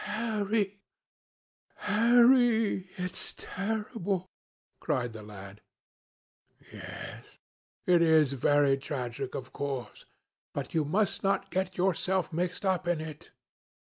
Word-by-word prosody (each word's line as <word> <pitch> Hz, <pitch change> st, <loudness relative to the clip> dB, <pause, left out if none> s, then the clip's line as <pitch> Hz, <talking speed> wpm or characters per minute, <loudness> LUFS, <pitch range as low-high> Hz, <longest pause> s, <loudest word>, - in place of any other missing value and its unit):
"Harry, 210 Hz, -2 st, -1 dB, 1.0 s
Harry, 230 Hz, -3 st, +4 dB
it 180 Hz, 0 st, -2 dB
is -, -, -3 dB
terrible!" 200 Hz, -2 st, -3 dB, 0.5 s
cried 120 Hz, -2 st, -1 dB
the 110 Hz, -, -8 dB
lad. 100 Hz, -1 st, -11 dB, 1.1 s
"Yes; -, -, -9 dB, 0.5 s
it 175 Hz, -1 st, +5 dB
is 160 Hz, -4 st, +5 dB
very 140 Hz, +1 st, +3 dB
tragic, 130 Hz, -2 st, -4 dB
of 130 Hz, -1 st, -6 dB
course, 135 Hz, -5 st, -4 dB, 0.5 s
but -, -, -4 dB
you 160 Hz, -2 st, +2 dB
must 195 Hz, +6 st, +1 dB
not 195 Hz, 0 st, 0 dB
get 185 Hz, 0 st, -1 dB
yourself 185 Hz, 0 st, +1 dB
mixed 180 Hz, +4 st, -2 dB
up 185 Hz, -2 st, +1 dB
in 175 Hz, -2 st, +1 dB
it. 155 Hz, -1 st, -8 dB
180 Hz, 110 wpm, -30 LUFS, 140-205 Hz, 1.1 s, it